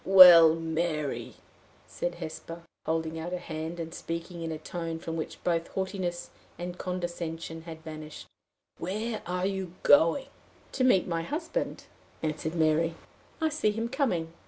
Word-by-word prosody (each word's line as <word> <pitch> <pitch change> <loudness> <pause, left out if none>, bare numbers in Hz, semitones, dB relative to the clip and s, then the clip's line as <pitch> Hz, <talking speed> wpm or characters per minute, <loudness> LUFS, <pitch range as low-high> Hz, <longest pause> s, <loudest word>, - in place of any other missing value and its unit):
"Well, 175 -4 +10
Mary," 160 -2 -2 0.5
said 175 0 -3
Hesper, 165 0 -7 0.2
holding 160 0 -1
out 175 +3 -4
her - - 0
hand, 160 0 -5
and 165 0 -5
speaking 170 +1 -5
in 165 -1 -3
a 160 - -3
tone 165 +1 -4
from 165 0 -5
which 160 - -5
both 170 -1 +1
haughtiness 190 -2 -3 0.3
and 175 0 -5
condescension 170 -3 -4
had 160 -1 -8
vanished, 155 -1 -8 0.5
"where 215 +5 -3
are 180 +1 -1
you 190 -3 -2
going?" 165 - +5 0.5
"To 260 - 0
meet 250 -8 +5
my 165 -2 -1
husband," 325 - -3 0.4
answered 155 +1 -2
Mary. 160 +1 +2 0.4
"I 320 -1 +2
see 300 -8 +1
him 225 +2 -2
coming." 205 - 0
170 Hz, 145 wpm, -29 LUFS, 160-185 Hz, 0.5 s, Well